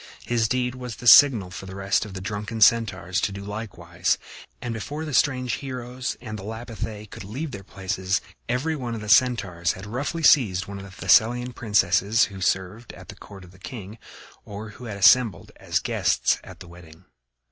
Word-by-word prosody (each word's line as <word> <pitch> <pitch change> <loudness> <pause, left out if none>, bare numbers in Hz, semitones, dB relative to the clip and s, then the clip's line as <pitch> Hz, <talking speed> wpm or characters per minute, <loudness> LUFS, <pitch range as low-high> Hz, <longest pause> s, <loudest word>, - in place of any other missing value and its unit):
His 115 -2 +1
deed 125 +1 -1
was 125 -3 -7
the 120 - -11
signal 110 -3 +7
for 95 0 -8
the 95 - -8
rest 100 +1 0
of 100 -2 -10
the 95 - -6
drunken 105 +2 -5
Centaurs 100 -4 +3
to - - 0
do 100 0 -7
likewise, 95 -5 -2 0.4
and 120 - -4
before 145 +8 -5
the 150 - -6
strange 125 -3 +1
heroes 125 -1 -5
and 110 -3 -7
the - - -9
Lapithæ 110 -1 -6
could - - -9
leave 135 +10 -5
their 100 -4 -8
places, 95 0 -2 0.3
every 135 +7 0
one 120 -5 -4
of 110 - -6
the 105 - -7
Centaurs 105 -7 +3
had 95 - -10
roughly 140 +9 -4
seized 100 -12 +4
one 100 0 -8
of 95 - -9
the - - -11
Thessalian 125 +2 +3
princesses 105 0 +2
who 95 - -9
served 95 +6 -2
at - - -14
the - - -9
court 100 -2 -13
of 90 - -15
the 90 - -19
king 105 +3 -9 0.4
or 105 +2 -8
who 115 +4 -12
had 105 -4 -6
assembled 115 +3 +4
as - - -1
guests - - +1
at - - -13
the 90 - -10
wedding. 85 0 -15
105 Hz, 195 wpm, -24 LUFS, 95-120 Hz, 0.4 s, signal